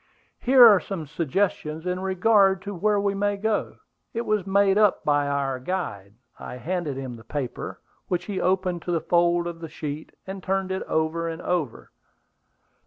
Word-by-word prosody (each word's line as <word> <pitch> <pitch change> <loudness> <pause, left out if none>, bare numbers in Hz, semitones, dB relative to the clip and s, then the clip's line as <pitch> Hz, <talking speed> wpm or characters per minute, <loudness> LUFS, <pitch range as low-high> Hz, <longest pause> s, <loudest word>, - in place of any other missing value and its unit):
"Here 255 -1 +7
are 210 -4 +8
some 170 -2 -5
suggestions 160 +1 -2
in 180 0 -1
regard 190 0 +3
to 205 - -5
where 205 +3 +1
we 200 0 +1
may 205 0 0
go; 220 +1 -1 0.4
it 230 - 0
was 210 -3 0
made 195 0 +3
up 210 -1 +3
by 145 -1 +2
our 140 -2 -1
guide;" 120 - -4 0.2
and - - -8
I - - -6
handed 165 -1 -3
him 130 -3 -5
the 110 - -14
paper, 130 +2 -5 0.3
which 180 0 -1
he 200 -3 -3
opened 185 -2 0
to 175 - -4
the 170 - +1
fold 175 +1 +2
of 170 -1 -5
the 165 -1 -7
sheet, 150 +1 -6
and 190 0 -6
turned 190 0 -1
it 190 - -2
over 160 +1 0
and 165 0 -5
over. 165 -9 -2
180 Hz, 180 wpm, -25 LUFS, 155-195 Hz, 0.4 s, are